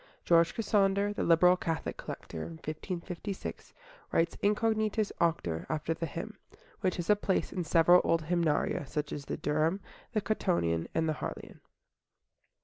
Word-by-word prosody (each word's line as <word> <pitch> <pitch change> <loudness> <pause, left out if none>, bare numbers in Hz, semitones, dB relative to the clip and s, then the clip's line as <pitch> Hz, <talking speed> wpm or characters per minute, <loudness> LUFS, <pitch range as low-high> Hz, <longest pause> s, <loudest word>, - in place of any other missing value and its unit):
George 170 -1 +4
Cassander, 205 -2 +2
the - - -3
liberal 180 +2 +5
Catholic 165 -3 -3
collector - - -7
(1556), 170 - -6 0.4
writes 165 0 +1
"Incognitus 215 0 +1
auctor" 120 - 0
after 155 +1 -1
the 165 0 -4
hymn, - - -7 0.4
which 185 - 0
has 175 - -4
a - - +6
place 200 -2 -1
in 180 - -2
several 170 +2 +5
old 165 -1 +2
Hymnaria, 160 -3 0
such 150 +1 -3
as 140 - -6
the - - -4
Durham, 155 +5 +1 0.3
the 215 - +1
Cottonian, 170 - 0
and 160 0 +2
the 155 - +1
Harleian. - - -7
170 Hz, 140 wpm, -31 LUFS, 160-195 Hz, 0.4 s, a